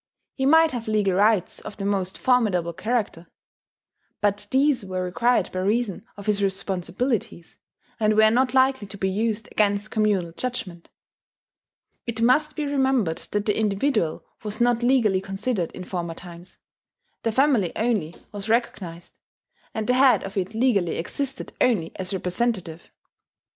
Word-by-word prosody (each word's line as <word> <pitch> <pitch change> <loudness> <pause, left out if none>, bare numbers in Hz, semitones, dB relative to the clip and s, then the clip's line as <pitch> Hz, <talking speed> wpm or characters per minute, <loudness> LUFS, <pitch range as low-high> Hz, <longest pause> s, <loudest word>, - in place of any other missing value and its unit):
He 265 -1 0
might 320 +2 +6
have 240 -3 -5
legal 210 -3 +1
rights 205 -1 +2
of - - -9
the 195 - -4
most 190 -2 -1
formidable 200 -10 +2
character; 210 -4 -2 0.9
but 205 0 0
these 270 -2 +2
were 185 -1 -3
required 235 +7 +1
by 185 - -3
reason 205 +1 -1
of 200 - -9
his 210 -1 +1
responsibilities, 195 +1 -2 0.4
and 215 -1 +2
were 220 0 +6
not 255 +2 +2
likely 260 -4 +3
to 200 - -9
be 190 - 0
used 220 +2 -1
against 205 0 +1
communal 205 -6 +1
judgment. 185 -5 -5 1.2
It 230 -1 -3
must 295 +6 +3
be 300 - -2
remembered 265 - +1
that 205 0 -1
the 210 - +1
individual 205 - 0 0.2
was 210 -1 -5
not 240 0 +2
legally 235 -7 +3
considered 195 -1 -2
in 185 - -7
former 170 -3 -4
times: 175 +1 -12 0.6
the 225 - 0
family 255 - +3
only 215 -8 0 0.2
was 205 +1 -6
recognized; 185 -7 -2 0.6
and 220 -1 -3
the 250 - +2
head 260 0 +5
of 195 0 -7
it 195 +2 -2
legally 220 -8 +2
existed 270 +10 -4
only 200 -10 +2
as 185 -1 -4
representative. 185 -2 -2
210 Hz, 150 wpm, -24 LUFS, 185-245 Hz, 1.2 s, might